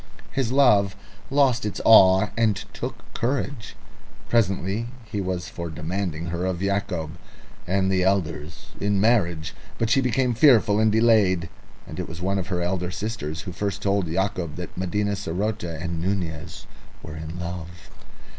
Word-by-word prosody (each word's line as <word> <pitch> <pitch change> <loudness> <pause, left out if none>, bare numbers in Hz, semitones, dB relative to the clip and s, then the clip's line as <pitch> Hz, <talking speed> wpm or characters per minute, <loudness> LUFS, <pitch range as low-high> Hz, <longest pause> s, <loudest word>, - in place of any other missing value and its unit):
His 130 -4 -1
love 105 -8 +4 0.3
lost 135 -4 +3
its 105 - -3
awe 95 -2 +7
and 115 -3 +2 0.2
took - - -7
courage. 130 -1 -2 0.5
Presently 100 0 +1 0.2
he 105 -2 -3
was 90 -2 -3
for 85 -1 -6
demanding 85 +1 -3
her 85 +1 -2
of 95 -2 -1
Yacob 90 -4 -2 0.5
and 95 +1 +1
the 95 -1 +2
elders 90 0 -1
in 100 -1 +1
marriage, 85 -8 +2 0.2
but 115 0 0
she 135 - +4
became 125 0 +1
fearful 115 -5 +5
and 110 0 +4
delayed. 105 -7 +3 0.4
And - - -8
it - - -4
was 85 - -8
one 95 +2 0
of 95 - -4
her 90 -2 -1
elder 90 0 -1
sisters 90 -5 -4
who 95 - -7
first 100 +1 -3
told 100 -2 +1
Yacob 90 -2 -2
that 90 -1 -7
Medina 100 +3 -1
saroté 100 -3 -3
and 85 -1 -3
Nunez 85 -3 -3 0.4
were 80 - -8
in 80 +2 -7
love. 90 0 -7
95 Hz, 155 wpm, -24 LUFS, 85-110 Hz, 0.5 s, awe